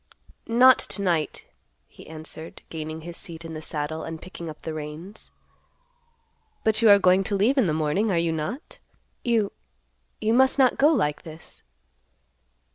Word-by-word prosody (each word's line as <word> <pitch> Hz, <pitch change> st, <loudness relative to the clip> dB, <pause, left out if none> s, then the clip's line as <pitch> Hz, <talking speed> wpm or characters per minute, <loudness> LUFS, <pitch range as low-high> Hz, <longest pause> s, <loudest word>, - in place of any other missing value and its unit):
"Not 250 Hz, +3 st, +6 dB
to 200 Hz, -, -3 dB
night," 170 Hz, -5 st, -1 dB, 0.4 s
he -, -, -16 dB
answered, 160 Hz, 0 st, -9 dB
gaining 155 Hz, 0 st, -6 dB
his 170 Hz, +1 st, -8 dB
seat 170 Hz, -3 st, -8 dB
in 165 Hz, -, -7 dB
the 155 Hz, -, -6 dB
saddle, 155 Hz, +1 st, -4 dB
and 165 Hz, 0 st, -6 dB
picking 170 Hz, -2 st, -8 dB
up 155 Hz, -, -11 dB
the 160 Hz, -, -4 dB
reins. 155 Hz, +7 st, -9 dB, 1.3 s
"But 220 Hz, 0 st, +2 dB
you 225 Hz, -, +6 dB
are 200 Hz, -, +9 dB
going 185 Hz, 0 st, +4 dB
to 205 Hz, -, -1 dB
leave 215 Hz, +8 st, +3 dB
in 260 Hz, -8 st, +3 dB
the -, -, +1 dB
morning, 155 Hz, +8 st, 0 dB
are 180 Hz, -, +1 dB
you 165 Hz, 0 st, +1 dB
not? 160 Hz, -, -5 dB, 0.4 s
You—you 65 Hz, -, -3 dB
must 265 Hz, +3 st, +4 dB
not 260 Hz, -2 st, +3 dB
go 285 Hz, -, +6 dB
like 200 Hz, -, +1 dB
this." 160 Hz, 0 st, -13 dB
170 Hz, 160 wpm, -25 LUFS, 155-215 Hz, 1.3 s, are